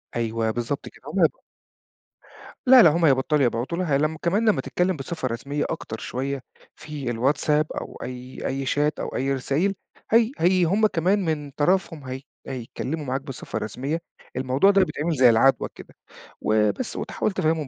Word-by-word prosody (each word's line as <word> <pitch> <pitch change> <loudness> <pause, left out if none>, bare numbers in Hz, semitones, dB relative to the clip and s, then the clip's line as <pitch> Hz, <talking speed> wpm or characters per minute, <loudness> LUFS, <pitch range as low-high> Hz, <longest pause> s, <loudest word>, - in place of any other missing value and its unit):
أيوه، 115 -1 0
بالضبط 120 +4 -3
كده. - - -20
هم - - -2
هيب - - +5 1.4
لا، 255 -1 +9
لا، 165 - +8
هم 165 +2 +2
هيبطَلوا 140 +1 +3
يبعتوا 120 +8 -1
لها 155 -7 +1
لمّا 155 +2 0
كمان 210 +6 +2
لمّا - - +2
تتكلّم 180 0 0
بصفة 135 -1 -4
رسمية 140 +5 -3
أكتر 110 -8 -5
شوية 135 +1 -3 0.3
في 150 -4 -6
الواتساب 145 +5 +1
أو - - -6
أي 125 +1 -6
أي 135 0 -2
شات 150 +3 0
أو - - -4
أي 135 +1 0
رسايل، 145 +9 0 0.4
هي 230 +2 +5
هي 180 +2 +3
هم 205 +6 +3
كمان 185 +2 +1
من 150 -3 -2
طرفهم 165 0 0
هي 130 +1 -5 0.3
هيتكلّموا 135 +4 -4
معاك 130 +1 -2
بصفة 130 -6 -6
رسمية. 135 +10 -3 0.3
الموضوع 130 +9 +3
ده 195 -1 +5
بيتعمل 165 -2 -2
زي 125 -2 +6
العَدوى 125 +4 +4
كده. - - -13 0.5
وبس 110 - +1
وتحاول 215 - -2
تفهِّمهم 160 -5 0
145 Hz, 165 wpm, -24 LUFS, 130-170 Hz, 1.4 s, لا